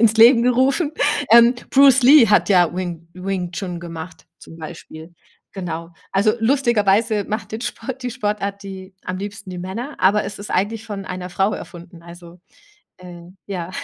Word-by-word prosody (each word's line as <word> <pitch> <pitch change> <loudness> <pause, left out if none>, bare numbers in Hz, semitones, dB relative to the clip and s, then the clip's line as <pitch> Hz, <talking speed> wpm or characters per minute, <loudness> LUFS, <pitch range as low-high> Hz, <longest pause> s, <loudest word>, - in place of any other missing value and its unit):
ins 225 -1 +4
Leben 235 +1 +7
gerufen. 265 +6 +2 0.4
Ähm, 235 +2 +7 0.2
Bruce 270 -1 +6
Lee 265 -1 +7
hat 210 - +3
ja 180 -3 +3
Wing 170 -3 -5
Wing 180 -1 -4
Chun 180 -2 -5
gemacht 165 0 -9
zum 165 - -14
Beispiel. 160 +1 -11 0.4
Genau. 170 -3 -6 0.2
Also, 200 +3 +3
lustigerweise 225 -4 +2
macht 215 +1 -5
den 220 - -4
Sport 265 +1 -6
die 250 - -3
Sportart 205 -4 -3
die 190 -1 -9
am 185 0 -4
liebsten 200 0 -7
die 180 - -7
Männer, 230 +11 -6
aber 205 +3 +3
es - - -7
ist 205 - -8
eigentlich 215 +4 -1
von 200 -2 -6
einer 180 0 -6
Frau 195 +3 0
erfunden. 170 -1 -11
Also, 170 0 -14 0.6
äh, 175 -1 -11 0.2
ja, 180 -3 -5
195 Hz, 165 wpm, -20 LUFS, 180-230 Hz, 0.6 s, Leben